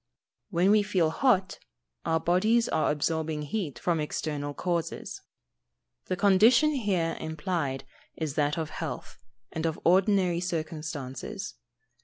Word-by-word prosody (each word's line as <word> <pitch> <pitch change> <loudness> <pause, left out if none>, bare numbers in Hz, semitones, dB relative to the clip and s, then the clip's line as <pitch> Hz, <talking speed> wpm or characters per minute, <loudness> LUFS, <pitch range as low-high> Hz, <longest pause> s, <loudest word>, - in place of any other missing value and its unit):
_ - - -55 0.5
When 185 +1 +3
we 210 0 +6
feel 185 -6 +1
hot, 195 -3 +2 0.5
our 160 0 +2
bodies 215 +8 +3
are 155 - +1
absorbing 155 0 -1
heat 150 - -3
from 170 -2 0
external 145 -1 -3
causes. 170 -2 -3 0.8
The - - -1
condition 220 - +5
here 195 - 0
implied 160 -3 -2 0.3
is 155 -3 -3
that 150 +2 +1
of 160 -2 -3
health, - - -6 0.3
and 160 - -4
of 160 - -3
ordinary 185 -1 +4
circumstances. 155 0 -4
170 Hz, 125 wpm, -28 LUFS, 155-195 Hz, 0.8 s, we